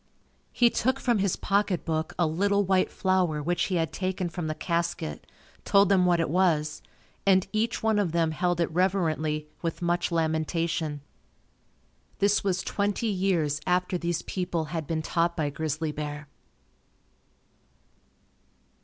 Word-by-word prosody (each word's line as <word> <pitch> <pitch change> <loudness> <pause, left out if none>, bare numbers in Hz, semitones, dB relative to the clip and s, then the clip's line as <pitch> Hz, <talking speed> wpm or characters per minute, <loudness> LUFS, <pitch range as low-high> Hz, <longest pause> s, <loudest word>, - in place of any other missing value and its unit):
He 240 -1 +4
took 260 +3 0
from 240 -4 +1
his 195 -2 +1
pocketbook 180 -6 -1
a 175 - +3
little 200 +6 +1
white 185 0 +2
flower 185 -5 +1
which 175 +3 0
he 185 - -1
had 165 -2 0
taken 185 -1 -2
from 165 -1 -4
the 155 - -2
casket, 170 - -2 0.4
told 200 0 +4
them 185 -2 +4
what 175 -1 +3
it 165 - +1
was 160 -5 +1 0.4
and 190 -2 +4
each 220 +2 -1
one 220 -1 +3
of 190 -5 0
them 165 -1 +1
held 175 +2 0
it 170 -1 +1
reverently 160 -4 0
with 165 -2 -3
much 175 0 0
lamentation. 160 -1 -1 1.2
This 205 0 +2
was 185 -3 0
twenty 205 +2 -1
years 175 -7 0
after 180 +1 +1
these 170 -1 -2
people 175 -3 -2
had 160 -3 -3
been 160 -1 -2
taught 170 +1 0
by 150 -3 0
Grizzly 155 +1 -2
Bear. 150 0 -5
175 Hz, 145 wpm, -27 LUFS, 160-190 Hz, 1.2 s, He